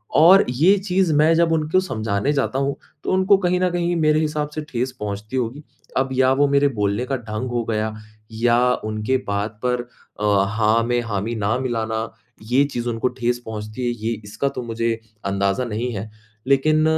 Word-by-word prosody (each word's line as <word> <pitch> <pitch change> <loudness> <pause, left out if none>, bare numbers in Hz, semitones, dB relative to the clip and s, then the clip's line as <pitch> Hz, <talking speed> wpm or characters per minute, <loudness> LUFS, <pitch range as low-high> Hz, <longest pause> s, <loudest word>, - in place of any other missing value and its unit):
और 185 +5 +7
ये 165 +11 +4
चीज़ 190 -3 +1
मैं 155 +2 +5
जब 165 0 +3
उनको 160 +3 +2
समझाने 110 - -1
जाता 135 -1 0
हूँ, 140 0 0 0.3
तो - - -1
उनको 190 +1 +4
कहीं 180 -1 +1
न 185 0 +2
कहीं 175 0 0
मेरे 155 -2 +3
हिसाब 150 -1 -1
से 155 - -2
ठेस 125 0 -2
पहुँचती 105 +3 -5
होगी, 125 +5 -3 0.3
अब 135 0 +1
या 130 0 +3
वो 145 +2 +3
मेरे 140 0 +3
बोलने 100 +4 0
का 135 - -1
ढंग 115 +2 -5
हो 120 -1 0
गया 110 0 -1 0.5
या 120 0 +4 0.2
उनके 110 +4 0
बात 105 +1 -2
पर 125 -1 +1 0.4
अ, 100 -2 +3
हाँ 110 +1 +2
मैं 120 +1 0
हामी 115 0 -3
ना 110 +1 0
मिलाना, 115 -3 -2 0.3
ये 125 +5 +3
चीज़ 120 -4 -3
उनको 115 +1 0
ठेस 120 -1 -1
पहुँचती 110 +2 -5
है - - +1 0.2
ये 115 - +1
इसका 110 +7 -2
तो 125 - -5
मुझे 115 0 -2 0.3
अंदाज़ा 100 +4 0
नहीं 120 +2 -3
है। 105 +2 -6 0.4
लेकिन 155 +3 +3
120 Hz, 185 wpm, -21 LUFS, 110-150 Hz, 0.5 s, और